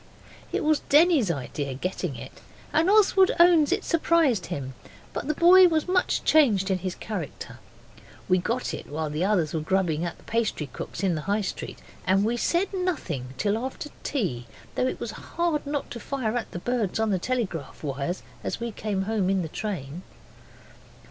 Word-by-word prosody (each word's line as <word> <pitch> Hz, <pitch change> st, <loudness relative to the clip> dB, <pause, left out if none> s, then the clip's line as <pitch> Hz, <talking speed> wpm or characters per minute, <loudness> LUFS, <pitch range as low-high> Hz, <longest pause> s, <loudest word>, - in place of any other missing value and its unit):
It -, -, -1 dB
was 305 Hz, -1 st, +3 dB
Denny's 300 Hz, -, +5 dB
idea 140 Hz, -2 st, -3 dB
getting 180 Hz, 0 st, -3 dB
it; -, -, -10 dB, 0.3 s
and 330 Hz, +4 st, +3 dB
Oswald 390 Hz, -2 st, +5 dB
owns 340 Hz, -4 st, +6 dB
it -, -, +1 dB
surprised 315 Hz, -, +2 dB
him, 135 Hz, -2 st, -5 dB, 0.4 s
but -, -, -4 dB
the 305 Hz, -, 0 dB
boy 360 Hz, +3 st, +8 dB
was 320 Hz, -1 st, 0 dB
much 365 Hz, 0 st, +1 dB
changed 210 Hz, -11 st, +4 dB
in 185 Hz, -, +1 dB
his 185 Hz, -1 st, -4 dB
character. 190 Hz, -9 st, -6 dB, 0.7 s
We 185 Hz, -, +4 dB
got 235 Hz, +7 st, -2 dB
it -, -, -6 dB
while 155 Hz, +1 st, -3 dB
the 155 Hz, +4 st, -1 dB
others 185 Hz, -6 st, +1 dB
were 160 Hz, -, 0 dB
grubbing 170 Hz, -1 st, 0 dB
at 175 Hz, -, -4 dB
the -, -, -20 dB
pastry 225 Hz, -9 st, -1 dB
cook's -, -, -6 dB
in 190 Hz, -3 st, +2 dB
the 155 Hz, -, -2 dB
High 205 Hz, +1 st, +2 dB
Street, 190 Hz, -, -5 dB, 0.3 s
and 195 Hz, +2 st, +3 dB
we 235 Hz, +2 st, +1 dB
said 345 Hz, -, 0 dB
nothing 175 Hz, -, -3 dB
till 210 Hz, +1 st, +1 dB
after 265 Hz, +3 st, -5 dB
tea, 160 Hz, -, -2 dB, 0.3 s
though 255 Hz, -, +1 dB
it -, -, -3 dB
was -, -, -4 dB
hard 335 Hz, -4 st, -2 dB
not 290 Hz, -1 st, -3 dB
to 235 Hz, -, -5 dB
fire 245 Hz, -2 st, -2 dB
at 240 Hz, -, -2 dB
the -, -, -6 dB
birds 220 Hz, 0 st, -1 dB
on 220 Hz, -1 st, +1 dB
the 190 Hz, -, +1 dB
telegraph 185 Hz, -, -3 dB
wires 140 Hz, +5 st, -3 dB, 0.2 s
as -, -, -3 dB
we 235 Hz, 0 st, -3 dB
came 205 Hz, -2 st, -2 dB
home 205 Hz, -2 st, 0 dB
in 190 Hz, -2 st, +1 dB
the 160 Hz, -, -5 dB
train. 175 Hz, -6 st, -5 dB
210 Hz, 185 wpm, -26 LUFS, -, 0.7 s, boy